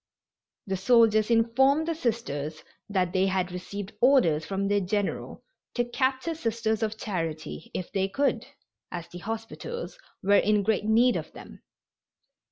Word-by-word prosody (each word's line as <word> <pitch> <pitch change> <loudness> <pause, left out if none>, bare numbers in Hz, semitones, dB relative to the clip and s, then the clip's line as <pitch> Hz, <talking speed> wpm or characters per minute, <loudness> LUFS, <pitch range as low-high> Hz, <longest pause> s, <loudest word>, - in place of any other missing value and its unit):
The 190 -1 -2
soldiers 215 +1 +4
informed 265 +7 +3
the 335 - +1
Sisters 165 - -3 0.3
that 185 -3 0
they 190 0 +3
had 185 -1 0
received 195 +2 -6
orders 240 - +4
from 195 0 -1
their 205 0 +2
general 200 +1 -2 0.3
"to 240 - +1
capture 260 +5 0
Sisters 230 -6 -1
of 220 0 -1
Charity, 165 -6 -4
if 180 - -4
they 195 -1 +1
could," 275 +8 0 0.4
as 170 -1 -5
the 175 - -9
hospitals 225 - -6 0.2
were 200 +1 +5
in 210 -1 +2
great 210 0 +1
need 235 +3 +4
of - - -6
them. - - -12
215 Hz, 145 wpm, -27 LUFS, 190-240 Hz, 0.4 s, were